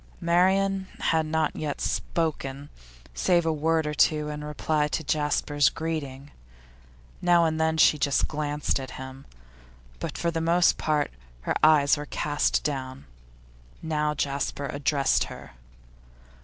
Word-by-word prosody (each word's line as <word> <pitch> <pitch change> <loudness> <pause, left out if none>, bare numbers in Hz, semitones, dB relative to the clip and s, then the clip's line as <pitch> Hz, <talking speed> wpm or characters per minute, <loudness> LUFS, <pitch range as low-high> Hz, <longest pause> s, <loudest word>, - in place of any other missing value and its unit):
Marian 190 +2 +2
had 160 -1 +1
not 160 0 0
yet 150 -2 -4
spoken, 145 -4 -2 0.4
save 170 - +2
a 160 - +1
word 160 +1 +1
or 150 - -2
two 150 0 +2
in 150 0 -6
reply 150 0 -1
to 160 - -3
Jasper's 145 -1 +1
greeting; 145 -4 -5 0.9
now 175 -1 +4
and 160 0 0
then 160 0 +1
she 155 -1 +5
just 140 -1 +1
glanced 150 -1 -2
at 130 -1 -7
him, 130 +1 -9 0.7
but - - -5
for 170 - 0
the 165 0 -2
most 170 +1 +3
part 150 -2 0 0.3
her - - -1
eyes 150 -1 +5
were 145 0 -6
cast 145 +1 0
down. 130 -2 -4 0.8
Now 150 -1 -1
Jasper 140 0 -2
addressed 140 0 +1
her. - - -11
150 Hz, 135 wpm, -26 LUFS, 145-160 Hz, 0.9 s, she